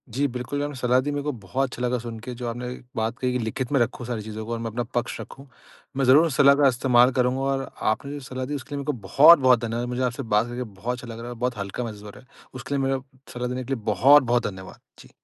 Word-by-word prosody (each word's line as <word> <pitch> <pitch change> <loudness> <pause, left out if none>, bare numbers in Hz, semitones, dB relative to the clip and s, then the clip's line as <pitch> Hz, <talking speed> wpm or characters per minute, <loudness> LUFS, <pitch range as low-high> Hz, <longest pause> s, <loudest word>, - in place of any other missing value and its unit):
जी 140 +2 +2
बिल्कुल 125 +3 -3
आपने 145 -1 -4
सलाह 125 0 +2
दी 145 - -1
मेरे 145 0 -3
को 150 - -1
बहुत 130 +8 -1
अच्छा 125 - -8
लगा 125 0 0
सुन 115 -1 -7
के 125 - -4
जो 120 - -3
आपने 120 +1 -5 0.3
बात 115 +2 -2
कही 125 -1 0
कि 125 - -1
लिखित 120 +3 -3
में 140 - +3
रखूँ 120 +1 -1
सारी 120 -3 -3
चीज़ों 110 +1 -7
को 115 - -6
और 115 - -3
मैं 115 0 -3
अपना 120 +3 -2
पक्ष 120 0 -2
रखूँ। 135 +1 -12 0.5
मैं 135 - +2
ज़रूर 145 +6 +6
इस 145 - -4
सलाह 140 0 +7
का 140 0 +4
इस्तेमाल 125 0 +4
करूँगा 125 +1 +1
और 135 0 -2 0.2
आपने 140 +6 -4
जो 145 - -5
सलाह 130 0 -4
दी 145 +3 -4
उसके 140 +1 -6
लिए - - -3
मेरे 140 - -5
को 150 - 0
बहुत-बहुत 135 - +7
धन्यवाद। 115 +2 -3
मुझे 125 +1 -2
आपसे 125 +2 -2
बात 110 0 +1
करके 120 +1 -4
बहुत 110 +2 -5
अच्छा 125 - -10
लग - - -9
रहा - - -8
है - - -6
और - - -13
बहुत 125 -2 -1
हल्का 100 +4 -4
महसूस 105 -3 -7
हो 105 - -9
रहा - - -13
है। 130 - -24 0.3
उसके 130 +2 -5
लिए 135 - 0
मेरा 135 0 0 0.3
सलाह 125 0 -3
देने 125 +1 -3
के 135 +2 -3
लिए 115 -5 -5
बहुत-बहुत 120 +3 +4
धन्यवाद। 95 -1 -9 0.2
जी। - - -15
125 Hz, 285 wpm, -24 LUFS, 115-135 Hz, 0.5 s, सलाह